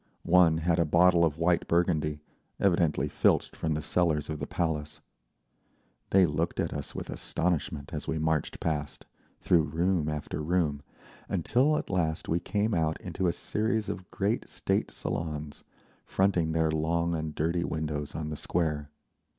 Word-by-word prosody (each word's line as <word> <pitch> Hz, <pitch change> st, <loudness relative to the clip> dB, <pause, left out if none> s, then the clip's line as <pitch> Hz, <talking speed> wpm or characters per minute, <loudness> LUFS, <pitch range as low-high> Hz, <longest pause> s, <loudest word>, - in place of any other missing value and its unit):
One 85 Hz, -2 st, +5 dB
had 85 Hz, +1 st, +1 dB
a -, -, +5 dB
bottle 85 Hz, +2 st, +5 dB
of 80 Hz, -2 st, +1 dB
white 85 Hz, +1 st, +2 dB
Burgundy, 80 Hz, -4 st, +1 dB, 0.4 s
evidently 85 Hz, -5 st, +2 dB
filched -, -, +2 dB
from 80 Hz, -1 st, -1 dB
the 75 Hz, -, -3 dB
cellars 80 Hz, -4 st, +1 dB
of 75 Hz, -, -4 dB
the 70 Hz, -, -4 dB
Palace. 80 Hz, -4 st, -2 dB, 1.1 s
They 95 Hz, -1 st, +6 dB
looked 80 Hz, +2 st, -1 dB
at -, -, -1 dB
us -, -, -5 dB
with -, -, -5 dB
astonishment 80 Hz, -4 st, -2 dB
as 75 Hz, -, -5 dB
we 80 Hz, -, -1 dB
marched 80 Hz, -1 st, -1 dB
past, 75 Hz, -3 st, -3 dB, 0.4 s
through 85 Hz, -2 st, +4 dB
room 80 Hz, +1 st, 0 dB
after 75 Hz, 0 st, -4 dB
room, 75 Hz, -3 st, 0 dB, 0.5 s
until 140 Hz, +6 st, +2 dB
at -, -, -4 dB
last 80 Hz, -4 st, 0 dB
we 85 Hz, -, +1 dB
came 105 Hz, +4 st, -1 dB
out 80 Hz, -2 st, 0 dB
into 95 Hz, -, -2 dB
a -, -, +3 dB
series 110 Hz, +2 st, -1 dB
of 90 Hz, -, -6 dB
great 100 Hz, +3 st, -1 dB
state -, -, -1 dB
salons, 75 Hz, -2 st, -4 dB, 0.4 s
fronting 90 Hz, -4 st, +1 dB
their 80 Hz, -1 st, +2 dB
long 85 Hz, +2 st, 0 dB
and 80 Hz, -2 st, -3 dB
dirty 85 Hz, +3 st, 0 dB
windows 75 Hz, -2 st, -3 dB
on 75 Hz, -1 st, -3 dB
the 75 Hz, -, -4 dB
Square. 75 Hz, -2 st, -1 dB
80 Hz, 160 wpm, -29 LUFS, 75-90 Hz, 1.1 s, They